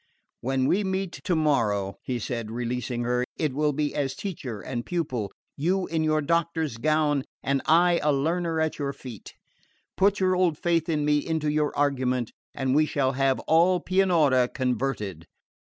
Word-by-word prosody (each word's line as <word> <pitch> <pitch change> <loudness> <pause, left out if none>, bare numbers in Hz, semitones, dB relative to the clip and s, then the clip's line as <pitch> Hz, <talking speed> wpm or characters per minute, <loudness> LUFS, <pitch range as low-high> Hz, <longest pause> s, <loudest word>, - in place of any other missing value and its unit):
"When 130 +1 0
we 200 +9 +2
meet 190 -1 -2
tomorrow," 115 - +1
he 125 - -3
said, 115 -1 -4
releasing 120 +1 -3
her, 125 +1 +1
"It 155 -5 -1
will 150 +2 +1
be 145 +1 -1
as 135 -2 -1
teacher 135 - -5
and 120 +2 -4
pupil, 130 - -2 0.2
you 180 +6 0
in 160 -1 -1
your 155 0 +2
doctor's 165 -4 0
gown 150 +1 +1 0.2
and 135 0 +1
I 170 +2 +5
a 150 - +2
learner 165 +4 0
at 160 0 -1
your 140 -1 -2
feet. 120 -7 -10 0.6
Put 200 +1 +3
your 185 -1 +2
old 180 -4 +2
faith 170 -1 0
in 150 -2 0
me 150 0 +3
into 155 -1 -1
your 150 -1 +1
argument, 130 -4 0 0.2
and 130 -1 0
we 155 +2 +4
shall 135 -3 +1
have 135 0 +1
all 175 +3 +4
Pianura 165 -10 +3
converted." 125 - -2
145 Hz, 165 wpm, -26 LUFS, 130-165 Hz, 0.6 s, I